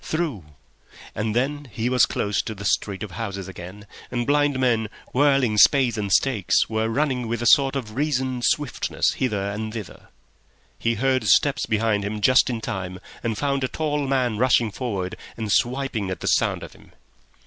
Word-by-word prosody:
Through! 155 - -3 0.7
And 105 +1 -2
then 145 +3 -1
he 115 +3 -2
was 125 -1 +4
close 105 +1 -1
to 110 - -6
the 100 0 -8
street 100 0 0
of 105 - -7
houses 100 0 -5
again, 95 +2 -10 0.2
and 120 -1 -2
blind 145 -1 +2
men, 115 -4 +1 0.2
whirling 135 -5 +3
spades 130 -3 +5
and 105 -3 -3
stakes, 110 -4 +2
were 110 0 -1
running 130 -1 0
with 120 +1 -2
a 135 +2 +4
reasoned 130 +1 -2
swiftness 125 +5 0
hither 100 -6 -1
and 110 +1 -4
thither. 110 -4 -8 0.7
He 115 0 0
heard 130 +3 +1
steps 145 +2 +3
behind 110 -1 +1
him 105 +1 -3
just 130 +5 +4
in 115 -2 -3
time, 95 -3 -5 0.2
and 115 -3 -2
found 140 0 0
a - - +1
tall 150 -1 -2
man 125 -5 0
rushing 120 -3 +3
forward 100 -6 -4 0.2
and 110 -2 -3
swiping 120 -4 0
at 95 - -5
the - - -4
sound - - +1
of - - -10
him. - - -20
115 Hz, 170 wpm, -23 LUFS, 105-135 Hz, 0.7 s, spades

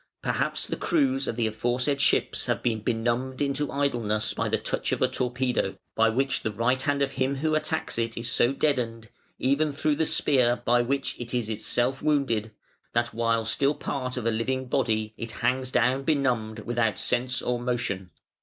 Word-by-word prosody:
Perhaps - - 0
the - - -3
crews 270 -4 +1
of - - -2
the 115 -1 0
aforesaid 125 +5 0
ships - - +2
have - - -1
been 115 -2 +1
benumbed 120 +4 -1
into 145 0 -1
idleness 120 -7 0
by - - -1
the - - +2
touch - - -2
of - - 0
a - - +3
torpedo, 125 -5 -1 0.2
by 115 0 +4
which 135 +3 0
the 110 - -2
right 115 +5 +1
hand 140 0 +1
of 135 - -1
him 135 0 0
who 155 +3 0
attacks 155 -4 -1
it 115 0 -2
is 115 0 -2
so 125 0 +3
deadened 120 -6 -1 0.3
even 140 +4 +1
through 150 +1 0
the 160 -1 +1
spear 125 -4 +3
by 120 +1 +4
which 135 +3 -1
it 120 +1 -4
is 115 -3 -1
itself 120 +4 0
wounded 135 -8 +1 0.4
that 120 -1 0
while 115 0 +1
still 140 +6 +1
part 130 -2 -3
of 120 - -3
a 115 - +3
living 130 +4 -1
body 110 -4 0
it 115 -1 -5
hangs 125 +3 0
down 125 +2 +2
benumbed 125 -7 0
without 120 -2 0
sense 125 +1 +1
or 125 0 -1
motion. 120 -7 -2
125 Hz, 185 wpm, -26 LUFS, 115-135 Hz, 0.4 s, by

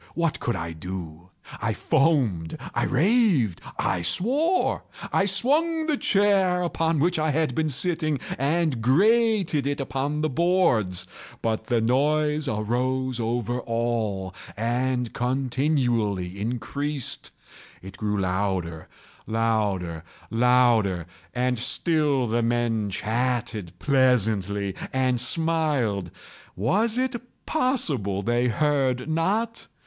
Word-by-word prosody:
what 165 -2 0
could 120 - -1
I 85 0 -4
do? 85 0 -7 0.3
I - - 0
foamed—I 125 - 0
raved—I 160 - +1
swore! 265 - +1 0.3
I 195 - +3
swung 305 - +2
the 305 -2 +1
chair 195 -6 +2
upon 165 -1 0
which 170 +3 +1
I 155 0 +1
had 155 -2 +1
been 155 +3 0
sitting, 155 0 0 0.2
and 145 -2 0
grated 195 - +3
it 145 0 -1
upon 140 +2 -2
the 155 - +1
boards, 125 - +2 0.4
but 110 -1 -1
the 120 -3 +1
noise 150 +5 +1
arose 125 +3 -1
over 120 +1 -1
all 115 -6 -2 0.2
and 125 +2 -1
continually 120 - 0
increased. 135 +4 -4 0.5
It 95 +1 -9
grew 105 0 -1
louder—louder—louder! 100 +3 0 0.3
And 125 -1 0
still 150 0 +1
the 120 +1 0
men 115 -2 0
chatted 110 -3 -2
pleasantly, 105 -7 +1 0.2
and 130 -2 +1
smiled. 150 - 0 0.5
Was 210 - +1
it 255 -2 -1 0.2
possible 150 - 0
they 120 +3 +1
heard 135 0 +1
not? 205 +9 -1
125 Hz, 100 wpm, -25 LUFS, 110-160 Hz, 0.5 s, I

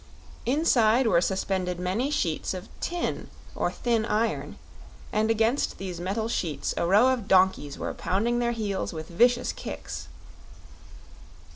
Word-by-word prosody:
Inside 250 -4 +3
were 175 -7 +4
suspended 185 -2 -1
many 190 +10 -1
sheets 185 - -1
of 185 +1 -8
tin 345 0 -3 0.3
or - - 0
thin 235 -2 0
iron, 225 0 -1 0.6
and 215 +1 +2
against 225 +4 +1
these 185 -3 -5
metal 200 +5 -2
sheets 160 -11 -2
a 170 - 0
row 210 +8 +5
of 245 -6 -1
donkeys 185 -7 +3
were - - -3
pounding 230 +6 0
their 240 0 +1
heels 210 -6 -2
with 160 -1 -7
vicious 240 +7 +3
kicks. - - -7
215 Hz, 135 wpm, -27 LUFS, 185-240 Hz, 0.6 s, row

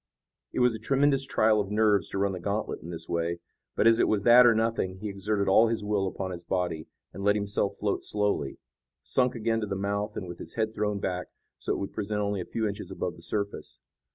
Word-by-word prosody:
It - - -1
was 125 -1 +4
a 110 - -5
tremendous 135 +3 +2
trial 110 -4 +3
of 100 - -5
nerves 105 -1 +2
to - - -4
run 100 0 +1
the 90 - -5
gantlet 100 +4 -2
in 85 - -9
this 85 -1 -5
way, 85 0 -1 0.4
but - - +2
as 115 0 +6
it - - +4
was 105 -2 +1
that 120 +2 +8
or 115 - +5
nothing 110 -4 0
he 105 +2 -5
exerted 100 +1 -1
all 110 +4 +6
his 115 -2 -1
will 105 -2 0
upon 95 0 -4
his 85 -1 -7
body, 90 -3 -2 0.3
and 100 - -7
let 105 +1 +4
himself 100 -1 -1
float 100 -1 -1
slowly, 105 -9 -1 0.5
sunk 125 -1 +1
again 115 0 0
to 105 - -2
the 100 - -2
mouth 100 +2 -2
and 95 - -4
with 85 - -8
his - - -10
head 110 -1 -1
thrown 105 -2 -1
back, 90 -2 -3 0.3
so - - -1
it - - -2
would 100 - -5
present 105 0 -2
only 100 -2 -1
a - - -5
few 110 -1 -2
inches 100 -1 -5
above - - -4
the - - -15
surface. 100 -1 -4
105 Hz, 240 wpm, -28 LUFS, 95-110 Hz, 0.5 s, that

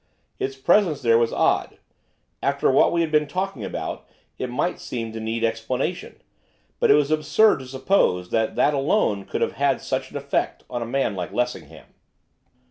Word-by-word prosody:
Its 135 0 -2
presence 170 +1 +2
there 115 -1 +5
was 115 -1 +1
odd, - - +1 0.6
after 140 0 +1
what 135 - +4
we 170 - +1
had 165 -2 -1
been 150 -1 +3
talking 185 - -3
about - - -5 0.3
it 130 - -3
might 145 +8 -1
seem 115 -2 -5
to 110 - -6
need 110 +1 -3
explanation; 115 +2 -2 0.6
but - - +3
it 140 - +8
was 150 0 +2
absurd 155 +6 +3
to 130 - -9
suppose 130 - +1
that 110 -1 0
that 150 - +3
alone 135 - +1
could - - -4
have - - +1
had - - +1
such - - -3
an - - -6
effect - - -2
on 120 -1 -3
a 115 - -3
man 135 -3 0
like 90 -3 -4
Lessingham. 125 0 -4
130 Hz, 180 wpm, -23 LUFS, 115-150 Hz, 0.6 s, it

